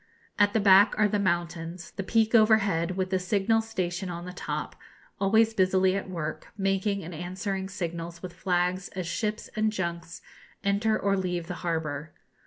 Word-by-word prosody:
At 205 Hz, 0 st, +4 dB
the 225 Hz, -, +3 dB
back 200 Hz, +1 st, +6 dB
are 210 Hz, -, +4 dB
the 205 Hz, 0 st, 0 dB
mountains, 175 Hz, -1 st, -2 dB
the -, -, -5 dB
peak 220 Hz, +3 st, +1 dB
overhead, 200 Hz, -6 st, +4 dB
with 185 Hz, 0 st, -1 dB
the 190 Hz, -, +2 dB
signal 200 Hz, +4 st, +2 dB
station 185 Hz, -4 st, -3 dB
on 170 Hz, 0 st, -6 dB
the 180 Hz, -, -7 dB
top, -, -, -4 dB, 0.4 s
always 220 Hz, +3 st, +3 dB
busily 190 Hz, -1 st, +3 dB
at 195 Hz, -1 st, -3 dB
work, 160 Hz, -4 st, -4 dB
making 195 Hz, 0 st, 0 dB
and 170 Hz, +2 st, -7 dB
answering 190 Hz, +3 st, -4 dB
signals 170 Hz, -3 st, -5 dB
with 180 Hz, -1 st, -6 dB
flags 180 Hz, 0 st, 0 dB
as 185 Hz, -2 st, -3 dB
ships 210 Hz, +6 st, -3 dB
and 215 Hz, 0 st, +1 dB
junks 170 Hz, -4 st, -4 dB, 0.4 s
enter 205 Hz, +2 st, +2 dB
or 200 Hz, 0 st, +1 dB
leave 180 Hz, -3 st, -2 dB
the 180 Hz, -, -5 dB
harbour. 155 Hz, -3 st, -3 dB
185 Hz, 170 wpm, -27 LUFS, 175-205 Hz, 0.4 s, back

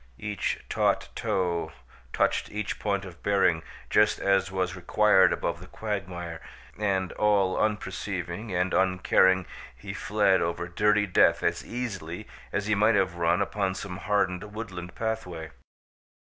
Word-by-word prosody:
Each 105 Hz, +6 st, -2 dB
taut -, -, +1 dB
toe 90 Hz, -3 st, -1 dB, 0.4 s
touched -, -, +1 dB
each 105 Hz, 0 st, -4 dB
point 100 Hz, -1 st, -1 dB
of 90 Hz, -2 st, -11 dB
bearing 95 Hz, -5 st, +2 dB, 0.3 s
just 105 Hz, 0 st, +4 dB
as 95 Hz, 0 st, +2 dB
was 95 Hz, -1 st, -1 dB
required 95 Hz, 0 st, +4 dB
above 85 Hz, 0 st, -2 dB
the 90 Hz, -, -11 dB
quagmire, 90 Hz, -7 st, -5 dB, 0.3 s
and, 95 Hz, -3 st, 0 dB
all 100 Hz, -3 st, +2 dB
unperceiving 100 Hz, -1 st, -2 dB
and 90 Hz, 0 st, 0 dB
uncaring, 95 Hz, 0 st, +3 dB, 0.3 s
he 95 Hz, +11 st, -8 dB
fled 100 Hz, -1 st, +2 dB
over 85 Hz, +1 st, -2 dB
dirty 105 Hz, +4 st, +2 dB
death 90 Hz, -, +3 dB
as -, -, 0 dB
easily 100 Hz, -9 st, -5 dB, 0.2 s
as 105 Hz, -, -1 dB
he 110 Hz, -, +1 dB
might 105 Hz, +2 st, +4 dB
have 95 Hz, -2 st, +2 dB
run 85 Hz, +3 st, +2 dB
upon 95 Hz, -2 st, -2 dB
some 95 Hz, -2 st, -6 dB
hardened 100 Hz, 0 st, -1 dB
woodland 90 Hz, -6 st, -6 dB
pathway. 110 Hz, -8 st, -4 dB
95 Hz, 135 wpm, -27 LUFS, 90-105 Hz, 0.4 s, just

